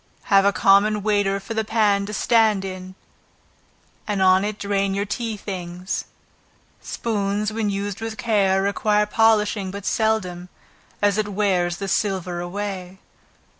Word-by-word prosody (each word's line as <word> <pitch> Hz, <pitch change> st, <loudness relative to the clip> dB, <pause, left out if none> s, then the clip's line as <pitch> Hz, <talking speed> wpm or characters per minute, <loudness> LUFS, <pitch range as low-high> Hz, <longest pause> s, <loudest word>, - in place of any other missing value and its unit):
Have 195 Hz, 0 st, +6 dB
a 200 Hz, -, +5 dB
common 200 Hz, +1 st, +3 dB
waiter 205 Hz, -2 st, +1 dB
for 225 Hz, -, -7 dB
the 220 Hz, 0 st, 0 dB
pan 205 Hz, -2 st, +1 dB
to -, -, -5 dB
stand 215 Hz, -2 st, +2 dB
in 185 Hz, 0 st, -7 dB, 1.1 s
and 205 Hz, -2 st, -1 dB
on 190 Hz, 0 st, +4 dB
it 210 Hz, 0 st, -3 dB
drain 200 Hz, -1 st, -1 dB
your 200 Hz, +1 st, -1 dB
tea 220 Hz, +1 st, -3 dB
things. 180 Hz, -2 st, -5 dB, 0.8 s
Spoons 210 Hz, -2 st, -2 dB
when 220 Hz, -2 st, -1 dB
used 200 Hz, +1 st, -3 dB
with 225 Hz, -1 st, -5 dB
care, 195 Hz, -4 st, +2 dB
require 210 Hz, +1 st, +1 dB
polishing 210 Hz, -2 st, +2 dB
but 200 Hz, +1 st, -7 dB
seldom, 185 Hz, -6 st, -1 dB, 0.5 s
as 205 Hz, 0 st, +3 dB
it 215 Hz, -, 0 dB
wears 190 Hz, -4 st, 0 dB
the 195 Hz, -, -4 dB
silver 185 Hz, -3 st, -1 dB
away. 185 Hz, 0 st, -5 dB
200 Hz, 140 wpm, -22 LUFS, 190-210 Hz, 1.1 s, Have